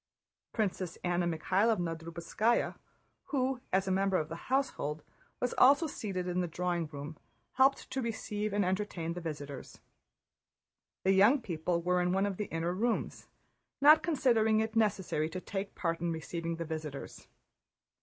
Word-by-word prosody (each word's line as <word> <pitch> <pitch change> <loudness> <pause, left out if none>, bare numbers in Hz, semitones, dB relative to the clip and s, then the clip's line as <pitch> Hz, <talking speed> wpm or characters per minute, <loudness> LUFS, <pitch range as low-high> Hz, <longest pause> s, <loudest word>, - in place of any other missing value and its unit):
Princess 190 -5 -2
Anna 175 -1 +1
Mikháylovna 175 +2 +1
Drubetskáya, 170 +8 0 0.5
who 260 -2 -1
as 190 +1 +2
a - - +1
member 195 0 +2
of 155 -2 -2
the 165 +7 -8
household 160 - -1 0.4
was 250 - -1
also 285 +5 +7
seated 195 - -4
in 180 0 0
the 175 - -1
drawing 175 0 -1
room, 150 +1 -8 0.3
helped 270 +1 +3
to 265 0 -1
receive 215 -2 -3
and 205 -1 +1
entertain 185 -3 -2
the 175 - -6
visitors. 145 -4 -7 1.2
The 190 - +4
young 205 +9 +6
people 170 -5 -2
were 180 0 +2
in 180 0 +1
one 195 +1 +2
of 200 -2 -2
the 210 - -2
inner 165 0 -2
rooms, 230 +5 -1 0.5
not 300 +3 +8
considering 230 -9 +3
it 220 0 -1
necessary 190 -8 +1
to 185 - -5
take 195 +1 -5
part 165 -2 -1
in 170 -1 0
receiving 165 +1 -3
the 165 0 -4
visitors. 155 -3 -6
185 Hz, 155 wpm, -32 LUFS, 165-220 Hz, 1.2 s, not